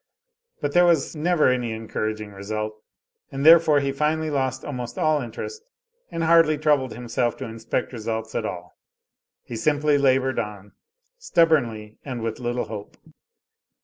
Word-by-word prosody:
But 145 -1 -2
there 175 - +6
was 165 -3 +2
never 160 +1 +2
any 125 -3 0
encouraging 110 -1 -4
result; 105 +2 -4 0.6
and 135 +1 -3
therefore 160 -3 +7
he 140 0 -1
finally 155 +2 0
lost 130 -2 -1
almost 125 -4 -5
all 155 -1 +2
interest, 135 - -7 0.5
and 165 - -3
hardly 165 -2 +5
troubled 145 -6 +1
himself 120 0 -1
to - - -5
inspect 115 +2 -3
results 110 -1 -4
at 115 - -1
all. 90 -4 -6 0.7
He 120 - -8
simply 145 +4 +2
labored 130 -1 +2
on, 105 -1 -6 0.5
stubbornly 130 - +1
and 125 -4 -5
with 115 -1 -3
little 120 0 -2
hope. 105 -2 -8
130 Hz, 145 wpm, -24 LUFS, 110-150 Hz, 0.7 s, therefore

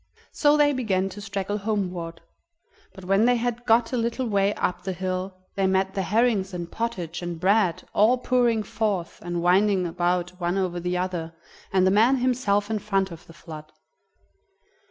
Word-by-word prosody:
So 295 0 +3
they 290 -1 +4
began 195 -7 0
to 205 +2 -9
straggle 200 0 -3
homeward, 180 -5 -3 0.7
but 190 -2 -11
when 195 +4 +3
they 245 0 +4
had 240 0 -2
got 230 +2 +3
a - - +1
little 235 +2 -1
way 200 -3 +2
up 180 - -1
the 190 - -3
hill 185 +1 -4 0.2
they 195 -1 +1
met 190 0 +1
the 195 - -1
herrings 205 -1 +1
and 170 -1 -6
pottage 185 -8 -4
and 175 -2 -5
bread, 190 -1 +2
all 225 +5 +4
pouring 240 -3 +1
forth 205 -4 -2
and 175 0 -3
winding 190 +1 +3
about 175 +1 0
one 175 +1 -1
over 180 -2 -1
the 180 +1 -2
other, 175 -3 -3 0.4
and 185 -1 +3
the 190 - +4
man 225 +7 +5
himself 235 -5 +1
in 215 - 0
front 195 -2 0
of 165 -1 -11
the 165 - -13
flood. 155 -2 -11
195 Hz, 175 wpm, -25 LUFS, 180-225 Hz, 0.7 s, man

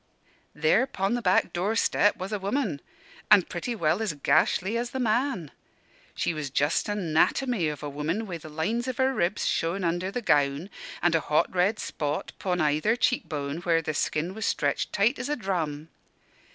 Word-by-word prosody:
"There 160 - +3
'pon 195 -1 -1
the 245 - -1
back 185 -3 +2
door 195 +6 0
step 205 -2 +3
was 190 +3 -5
a 210 - -1
woman! 200 - -1 0.5
an' 195 - +7
pretty 185 +9 -4
well 170 +1 +1
as 215 -7 -1
gashly 155 +8 +2
as 240 +1 -1
the 265 - -4
man. 230 - 0 0.6
She - - 0
was 150 -3 -4
just 145 +8 +1
a 205 - 0
'natomy 185 - +1
of 150 - -9
a - - -3
woman, 150 +9 -2
wi' 175 -5 -6
the 155 - -10
lines 210 +11 -2
of 255 - -3
her 265 0 +2
ribs 175 -3 0
showin' 175 +4 0
under 175 +2 0
the 240 +4 -4
gown, 145 +3 +1 0.3
an' 175 -1 +4
a - - +4
hot 150 +2 +1
red 185 +4 +2
spot 150 -6 -3
'pon 180 -2 -1
either 155 +8 +2
cheek 250 +1 0
bone, 145 -1 -3
where 170 -1 +2
the 155 - -2
skin 155 +4 -1
was 220 +1 -3
stretched 140 -1 0
tight 220 +7 +2
as - - -4
a 295 - +1
drum. 165 - -3
180 Hz, 190 wpm, -27 LUFS, 155-220 Hz, 0.6 s, an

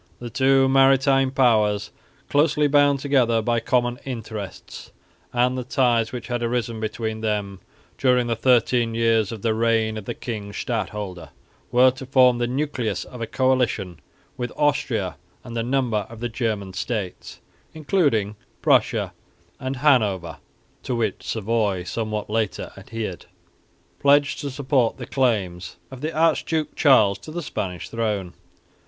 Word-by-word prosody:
The 120 -1 -8
two 135 0 +4
maritime 135 0 +4
powers, 105 -6 +2 0.4
closely 150 0 +3
bound 145 -1 +4
together 130 -5 +2
by 120 +1 +1
common 120 +1 0
interests, 110 -6 -7 0.4
and 125 +1 +2
the 130 - -3
ties 120 -3 +1
which 125 -1 -6
had 120 -1 -3
arisen 115 -1 -2
between 110 0 -3
them 105 -3 -2 0.4
during 125 -2 +3
the 115 -1 -1
thirteen 120 -1 +2
years 115 -3 +2
of 110 -3 -8
the 115 -1 +2
reign 110 -1 +1
of 100 - -11
the - - -4
king 105 -4 -6
stadholder, 105 -8 -4 0.4
were 130 +1 +6
to 130 0 -10
form 125 -2 +4
the 120 - 0
nucleus 125 -7 -2
of 125 - -10
a 115 - -2
coalition 125 -10 0 0.4
with 120 -1 -3
Austria 130 -10 0 0.3
and 120 -1 -8
a 115 - 0
number 120 -4 0
of 115 -1 -11
the 120 +1 -3
German 110 -5 -3
states, 105 -4 -4 0.4
including 140 - +1 0.3
Prussia - - +2 0.5
and 130 +1 -3
Hanover 110 - +2 0.4
(to 125 - -3
which 110 -4 -1
Savoy 105 -4 -1
somewhat 110 +2 -3
later 110 -2 -2
adhered), 110 -6 -6 0.7
pledged 140 0 +3
to 145 - -4
support 130 -3 0
the 125 - -6
claims 95 -10 -1 0.2
of 130 -1 -9
the 155 +2 -2
Archduke 160 0 +1
Charles 110 -9 +4
to - - -11
the 170 +2 -5
Spanish 90 -9 -4
throne. 105 -6 -2
120 Hz, 145 wpm, -23 LUFS, 110-130 Hz, 0.7 s, were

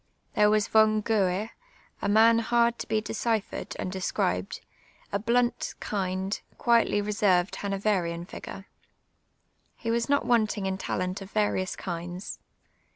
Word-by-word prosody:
Tliere 210 0 +5
was 215 -1 +2
Von 215 -1 +4
Goue, 205 -1 +1 0.3
& - - -32
man 230 +1 +6
hard 235 +1 +2
to - - -5
be 220 -1 +1
deciphered 225 -1 -2
and 185 - -3
described, 95 - -1 0.5
a 200 - 0
blunt, 240 +3 0
kind^ 190 0 -2 0.2
quietly 230 -3 +3
reserved 200 -3 +2
Hanoverian 195 -4 -1
fiij^re. 195 +1 -9 1.1
He 230 - -2
was 235 +3 0
not 285 0 +2
wanting 215 -4 +2
iiu 190 0 -2
talent 185 +1 -2
of 195 - -8
various 205 -3 0
kinds. 175 +1 -6
205 Hz, 130 wpm, -27 LUFS, 185-225 Hz, 1.1 s, man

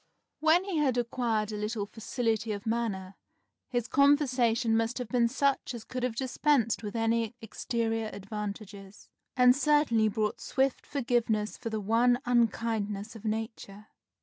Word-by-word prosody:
When 320 +3 +4
he 385 -4 -3
had 270 -5 +2
acquired 230 -3 -1
a 210 - -4
little 210 0 -2
facility 225 0 -2
of 200 -1 -7
manner, 210 -5 -2 0.5
his 240 -2 -1
conversation 255 -6 +3
must 225 +2 0
have 250 -4 -5
been 240 -2 +3
such 275 0 0
as 230 - -8
could 255 +2 -5
have 250 -2 -1
dispensed 260 -2 +1
with 210 0 -6
any 230 0 0
exterior 225 0 -2
advantages, 200 -1 -7 0.3
and 250 0 +6
certainly 280 -6 +3
brought 215 0 -2
swift 265 0 -1
forgiveness 235 -6 0
for 230 - -5
the 220 -1 -2
one 235 +4 +3
unkindness 225 -3 0
of 225 0 -11
nature. 215 -1 -5
230 Hz, 145 wpm, -29 LUFS, 215-250 Hz, 0.5 s, and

